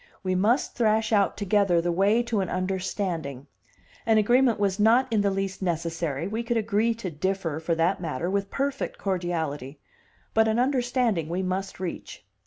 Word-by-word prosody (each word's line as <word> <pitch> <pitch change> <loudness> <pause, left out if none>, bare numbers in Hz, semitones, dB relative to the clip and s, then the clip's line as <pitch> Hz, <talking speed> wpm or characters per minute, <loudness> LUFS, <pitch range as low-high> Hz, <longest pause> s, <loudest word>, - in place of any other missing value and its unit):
We 185 -1 0
must 215 +8 +2
thrash 220 -1 +2
out 200 -2 +2
together 200 -3 +2
the 175 +1 0
way 200 +7 +3
to 235 -3 -1
an 190 -3 -1
understanding; 185 -7 -3 0.6
an 225 -1 +3
agreement 240 +2 +3
was 200 -1 0
not 235 +5 +4
in 215 - +3
the 200 - +2
least 195 0 -3
necessary 165 -4 -2
we 220 +3 -2
could 235 0 -1
agree 225 +1 +1
to 200 -6 -5
differ, 165 -1 -2
for 165 +1 -1
that 170 +3 +1
matter, 160 -1 -3
with 200 +1 -1
perfect 275 0 -2
cordiality 160 -7 -3 0.5
but 220 0 +4
an 220 +1 +1
understanding 245 - +1
we 180 +3 -1
must 190 +1 -3
reach. 180 - -6
195 Hz, 170 wpm, -26 LUFS, 175-220 Hz, 0.6 s, not